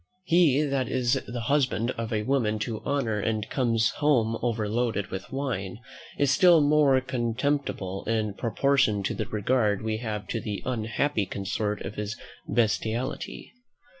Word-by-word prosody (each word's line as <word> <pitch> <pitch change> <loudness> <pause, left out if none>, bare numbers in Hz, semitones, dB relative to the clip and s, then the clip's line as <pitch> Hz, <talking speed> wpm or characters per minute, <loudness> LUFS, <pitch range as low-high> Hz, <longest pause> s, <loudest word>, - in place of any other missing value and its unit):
He 165 -5 +4
that 135 -4 -1
is 130 +1 +1
the 120 0 -4
husband 125 -4 +1
of 115 -1 -5
a 105 -1 0
woman 120 -4 +1
of 110 -3 -5
honour, 120 -7 0
and 110 0 -1
comes 115 -4 +2
home 120 -7 +2
overloaded 115 -2 -1
with 95 0 -6
wine, 120 -10 -3 0.4
is 140 -2 +3
still 175 +1 +6
more 145 -2 +4
contemptible 120 -5 -2
in 110 -2 0
proportion 120 -2 +1
to - - -1
the 105 - -3
regard 105 -1 +1
we 110 -1 -1
have 105 -3 -4
to 115 - -2
the 105 -2 -4
unhappy 115 -1 -1
consort 105 +2 -2
of 100 +2 -6
his 105 0 -4 0.3
bestiality. 115 +2 -1
115 Hz, 145 wpm, -27 LUFS, 105-135 Hz, 0.4 s, still